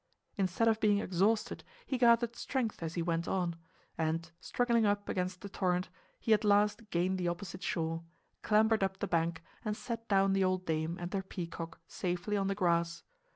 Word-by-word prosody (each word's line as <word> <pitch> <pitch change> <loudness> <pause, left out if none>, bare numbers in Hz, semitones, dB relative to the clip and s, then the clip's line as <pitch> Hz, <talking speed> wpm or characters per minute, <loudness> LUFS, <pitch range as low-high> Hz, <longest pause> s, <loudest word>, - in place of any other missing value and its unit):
Instead 195 +3 +1
of 220 -1 +3
being 210 -2 +4
exhausted 200 +3 +1 0.2
he 265 - -2
gathered 235 -1 +4
strength 245 -8 -2
as 165 0 -4
he 170 - 0
went 165 0 -1
on; 175 -3 0 0.4
and, 160 +1 -1
struggling 235 +1 +1
up 205 -1 +1
against 180 -1 -2
the 200 - -6
torrent, 180 -2 0 0.3
he 225 - +3
at 215 +1 +3
last 210 +1 +3
gained 185 +1 +1
the 175 - 0
opposite 180 +2 -4
shore, 165 -3 -1 0.4
clambered 220 0 +3
up 190 0 0
the - - -2
bank 165 -1 0 0.2
and 210 -2 -2
set 230 -1 -5
down 195 -1 +4
the 195 0 +3
old 185 0 +1
dame 160 +1 -1
and 175 +2 -5
her 195 - 0
peacock 170 -3 -6
safely 180 +3 -2
on 195 -1 +1
the 195 - 0
grass. 170 -3 +1
190 Hz, 185 wpm, -33 LUFS, 170-210 Hz, 0.4 s, being